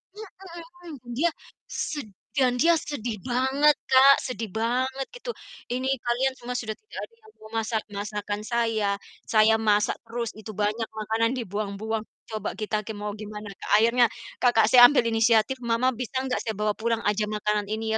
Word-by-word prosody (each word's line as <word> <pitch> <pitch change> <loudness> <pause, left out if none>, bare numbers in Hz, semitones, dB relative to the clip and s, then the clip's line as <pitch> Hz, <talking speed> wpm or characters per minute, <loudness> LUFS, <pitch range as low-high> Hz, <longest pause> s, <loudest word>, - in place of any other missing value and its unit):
Mhm 430 -1 -8 0.8
mhm, 240 - -7
dia 340 +5 +3 0.4
sed 290 -8 -4 0.3
dan 255 -2 +3
dia 335 0 +5
sedih 240 -8 -4
banget 265 +4 +3 0.2
Kak, 270 +1 +8
sedih 230 -3 -4
banget 255 +4 -1
gitu. - - -6 0.3
"Ini 255 +2 -2 0.2
kalian 255 +3 +1
semua 250 0 -6
sudah 220 -3 -3
tidak 430 - -14
ada 460 - -10
yang 435 -1 -19
mau 215 - -12
masak 220 0 -1
masakan 205 0 -4
saya, 225 -3 0 0.4
saya 220 0 +5
masak 210 -1 +2
terus 235 0 -3
itu 215 0 -8
banyak 210 +3 -1
makanan 220 +1 0
dibuang-buang." 215 0 -3 0.2
Coba 215 -2 -4
kita 215 -1 -3
ke 220 - -5
mau 205 0 -4
gimana 210 0 -8
Kak, - - -8
akhirnya 235 +2 +5 0.3
kakak 240 -3 +4
saya 245 -1 +10
ambil 285 -2 +2
inisiatif, 225 +2 +3
"Mama 235 +1 +1
bisa 250 +1 -3
nggak, 260 -1 -1
saya 220 - -1
bawa 210 +1 0
pulang 230 0 0
aja 210 +1 0
makanan 210 -1 -1
ini 220 +1 -1
225 Hz, 165 wpm, -26 LUFS, 215-255 Hz, 0.8 s, saya